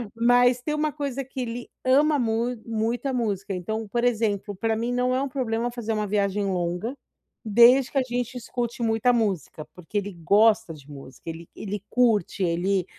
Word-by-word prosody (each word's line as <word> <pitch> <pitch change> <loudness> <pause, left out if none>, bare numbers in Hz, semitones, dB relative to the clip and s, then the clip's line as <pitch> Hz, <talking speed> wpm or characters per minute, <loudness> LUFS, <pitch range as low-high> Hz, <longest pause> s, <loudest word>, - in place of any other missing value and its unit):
Mas 245 +1 +4
tem 300 +4 -2
uma 305 0 0
coisa 275 -2 -3
que 265 0 -6
ele 240 0 -5
ama 290 +3 +4
mu 235 +1 0
muito, 230 +3 -1
a 270 - -1
música. 205 -5 -2
Então, 220 +5 -4
por 235 +4 -1
exemplo, 215 -4 0
pra 225 +3 0
mim 235 +2 -2
não 250 +1 +1
é 260 - +1
um 280 - -1
problema 240 -2 -1
fazer 235 -2 -4
uma 215 -1 -1
viagem 200 0 0
longa, 180 +5 -2 0.5
desde 240 +4 +6
que - - -2
a 270 - +4
gente 245 0 -3
escute 240 0 -4
muita 225 +2 +2
música, 195 - -1
porque 180 +3 -6
ele 205 0 -2
gosta 210 0 +4
de 145 -2 -15
música, 135 +1 -10
ele 165 +1 -8
ele 205 -1 -5
curte, 225 -6 +2
ele 180 +2 +1
225 Hz, 185 wpm, -25 LUFS, 200-245 Hz, 0.5 s, desde